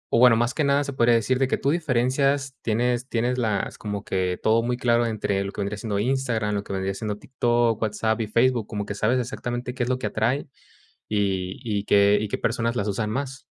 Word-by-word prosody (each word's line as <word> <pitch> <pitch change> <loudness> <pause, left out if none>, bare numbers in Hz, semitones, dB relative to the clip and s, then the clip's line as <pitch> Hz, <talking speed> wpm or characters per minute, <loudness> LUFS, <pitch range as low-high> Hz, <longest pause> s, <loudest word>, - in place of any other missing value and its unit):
o, - - +4
bueno, 125 -2 +7
más 120 +2 +1
que 155 - 0
nada 140 0 +3
se 140 -1 -5
podría 120 -2 +4
decir, 125 +3 +1
de 135 - +2
que - - 0
tú 140 - 0
diferencias 140 -2 +1
tienes 120 +3 0
tienes 125 +2 0
las 110 -4 -1
como 105 -2 -4
que 90 -1 -1
todo 110 +1 +4
muy 120 +1 -1
claro 120 -1 +2
entre 100 -3 -1
lo 100 - -5
que - - -5
vendría 100 +1 -2
siendo 105 -1 -3
Instagram, 115 -3 0
lo 100 0 -1
que - - -9
vendría 95 0 -2
siendo 105 0 -4
TikTok, 120 -2 0
WhatsApp 110 +1 0
y 110 - -2
Facebook, 120 0 +2
como 105 -2 -4
que - - -4
sabes 110 +5 +1
exactamente 125 0 -4
qué 125 - -6
es 120 - 0
lo 130 - +1
que 125 - -5
atrae, 115 +7 0 0.7
y 95 -3 -1
y 105 -3 -2
qué 100 0 +5
y 110 - -2
qué - - -2
personas 115 +1 -1
las 100 -2 -1
usan 105 +1 -1
más. 135 +2 -4
115 Hz, 230 wpm, -24 LUFS, 105-125 Hz, 0.7 s, bueno